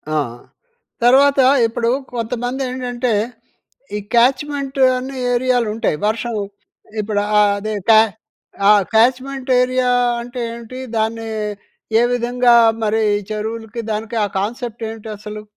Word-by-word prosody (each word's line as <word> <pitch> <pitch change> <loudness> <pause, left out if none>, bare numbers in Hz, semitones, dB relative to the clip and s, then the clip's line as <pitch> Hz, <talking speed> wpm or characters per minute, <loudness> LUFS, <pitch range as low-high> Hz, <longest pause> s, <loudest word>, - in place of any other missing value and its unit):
ఆ! - - +2 0.9
తర్వాత 275 +3 +5 0.3
ఇప్పుడు 230 +1 -1 0.2
కొంతమంది 245 +3 -3
ఏంటంటే, 250 -1 -2 0.8
ఈ - - -1 0.2
క్యాచ్‌మెంట్ 275 +3 +1 0.2
అనే 265 +1 -6 0.2
ఏరియాలు 245 -2 +1
ఉంటాయి, 220 -8 0
వర్షం 230 +2 -1 0.7
ఇప్పుడు 205 -1 -1 0.2
ఆహ్, 205 -1 +4
అదే 215 +1 -4 0.2
క్యా 220 -1 +8 0.7
ఆహ్, 205 -2 +6
క్యాచ్‌మెంట్ 260 +3 +1
ఏరియా 255 0 +1 0.3
అంటే 245 +1 -7
ఏంటి? 235 +2 -9 0.2
దాన్ని 225 +1 -1 0.7
ఏ - - +4
విధంగా 245 0 +2 0.3
మరి 220 +1 +1 0.3
చెరువులకి 225 +2 -4
దానికి 220 +2 -4
ఆహ్, 200 - -5
కాన్సెప్ట్ 235 +2 -4
ఏంటి 225 0 -9
అసలు? 210 0 -8
235 Hz, 115 wpm, -18 LUFS, 220-255 Hz, 0.9 s, క్యా